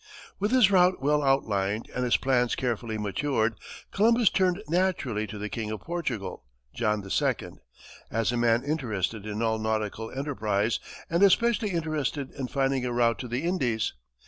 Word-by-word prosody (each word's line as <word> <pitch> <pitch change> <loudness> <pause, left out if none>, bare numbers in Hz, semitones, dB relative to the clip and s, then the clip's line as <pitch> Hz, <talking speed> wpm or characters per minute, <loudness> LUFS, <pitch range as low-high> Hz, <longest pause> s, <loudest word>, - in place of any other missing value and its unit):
With 205 +2 +1
his 245 -5 +5
route 180 -1 +4
well 150 +2 +2
outlined 110 -7 +1
and 125 - -1
his 125 - +3
plans 125 -2 +1
carefully 115 -3 -2
matured, 110 +2 0 0.4
Columbus 230 +2 +4
turned 185 -1 +2
naturally 160 - 0
to 105 +1 -7
the 105 +1 -4
King 110 0 -4
of 110 - -5
Portugal, 150 - -4 0.3
John 105 -4 -1
II., - - +2 0.8
as 115 +1 0
a - - -2
man 120 0 +3
interested 115 - -2
in 105 +2 -3
all 110 -1 +1
nautical 110 0 -2
enterprise, 110 -6 -1 0.3
and 170 +2 0
especially 225 +2 +4
interested 155 -5 -2
in 135 -3 -5
finding 135 -1 0
a 125 - -1
route 120 -1 +2
to 125 - -5
the 120 +5 -2
Indies. 130 -11 0
125 Hz, 160 wpm, -27 LUFS, 110-160 Hz, 0.8 s, his